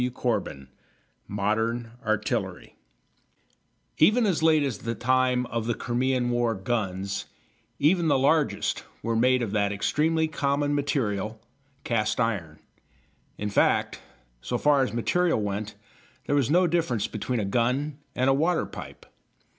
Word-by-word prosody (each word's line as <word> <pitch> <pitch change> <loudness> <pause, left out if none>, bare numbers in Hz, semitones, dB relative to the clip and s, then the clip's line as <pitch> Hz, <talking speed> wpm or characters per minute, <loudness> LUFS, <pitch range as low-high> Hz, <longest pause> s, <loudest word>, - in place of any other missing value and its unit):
CHAPTER 120 -3 0
XIX 70 - -9 0.7
MODERN 110 +3 -1
ARTILLERY 110 -1 -2 1.2
Even 220 +8 +5
as 185 -6 +1
late 160 -2 +4
as 130 -7 -2
the 115 0 -3
time 125 +1 +2
of 115 -2 -3
the 120 - 0
Crimean 125 0 0
War 120 -2 +1
guns, 95 -2 -2 0.5
even 165 +3 +3
the 145 -3 +4
largest, 145 +3 +1 0.2
were 115 0 -1
made 125 +2 +3
of 110 - -3
that 100 -1 +1
extremely 160 +10 +1
common 145 -1 0
material, 110 -7 -1 0.4
cast 115 -1 0
iron. 95 -10 -1 0.8
In 105 0 -3
fact, - - +2 0.4
so 120 - -2
far 145 +1 +3
as 130 - 0
material 170 +7 +1
went, 105 +1 -3 0.5
there - - -1
was 140 -4 +2
no 180 +4 +4
difference 155 - 0
between 120 +2 -3
a 105 - -1
gun 125 +8 0 0.2
and 130 +1 +1
a 135 - +5
water 165 +5 +1
pipe. - - -10
120 Hz, 140 wpm, -26 LUFS, 110-145 Hz, 1.2 s, Even